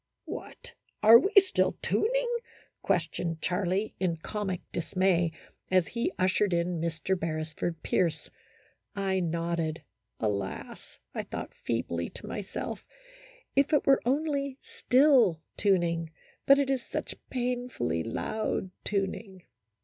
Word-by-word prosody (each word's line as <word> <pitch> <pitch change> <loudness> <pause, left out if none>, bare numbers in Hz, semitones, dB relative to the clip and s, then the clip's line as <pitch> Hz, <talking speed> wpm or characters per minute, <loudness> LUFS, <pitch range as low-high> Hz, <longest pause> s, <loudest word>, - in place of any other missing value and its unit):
" - - -57
What! 485 - -8 0.3
are 225 +2 +10
we 390 - 0
still 385 -1 +4
tuning? - - +1 0.3
" - - -32
questioned 165 0 -1
Charlie, 185 +3 0
in 175 -3 0
comic 190 +1 -3
dismay, 175 -1 +1 0.4
as 185 -2 +3
he 235 +9 -1
ushered 185 +1 +2
in 170 -1 0
Mr. 165 +3 -1
Beresford 160 0 -3
Pierce. 170 -4 0 0.7
I 195 -1 0
nodded. 170 -2 -1 0.4
Alas! 100 -3 -4 0.2
I - - -2
thought - - -6
feebly 85 -7 -2
to - - -8
my 210 - -4
self, 195 - -5 0.7
if 280 +2 +3
it 295 - +4
were 270 -1 +5
only 280 0 0
" - - -50 0.2
still 255 - +5
" - - -55
tuning; 170 -5 +1 0.4
but 275 - +8
it 275 -1 +1
is 265 -2 +1
such - - -4 0.2
painfully 245 - -1
loud 190 - -2
tuning. 195 -1 -3
185 Hz, 130 wpm, -29 LUFS, 165-245 Hz, 0.7 s, are